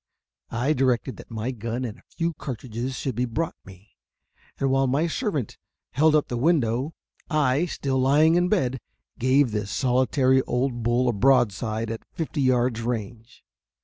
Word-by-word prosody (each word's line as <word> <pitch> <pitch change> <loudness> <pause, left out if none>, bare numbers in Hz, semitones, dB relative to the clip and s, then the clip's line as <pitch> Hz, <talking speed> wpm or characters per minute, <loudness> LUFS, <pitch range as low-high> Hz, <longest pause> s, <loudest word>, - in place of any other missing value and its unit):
I 125 +6 0
directed 130 -4 0
that - - -12
my 115 +3 -3
gun 120 +1 -4
and 110 -3 -7
a - - -28
few 170 0 0
cartridges 125 -2 -5
should 130 - -3
be 125 +3 0
brought 150 +7 -2
me, 95 +2 -15 0.7
and 135 -1 0
while 135 0 +3
my 140 +6 +1
servant 170 - -2 0.3
held 155 +2 +4
up 150 - +2
the 120 - -3
window, 135 -1 +1 0.3
I, 150 +1 +2
still 135 -5 -2
lying 145 +5 +4
in 175 +1 +2
bed, 130 -11 +1 0.4
gave 130 0 +3
this 105 -1 -3
solitary 130 +2 +2
old 125 0 -1
bull 120 +2 +1
a 120 - +2
broadside 115 -2 +2
at 115 - -5
fifty 160 -2 -2
yards 125 -3 +2
range. 115 -1 -5
130 Hz, 160 wpm, -25 LUFS, 115-140 Hz, 0.7 s, held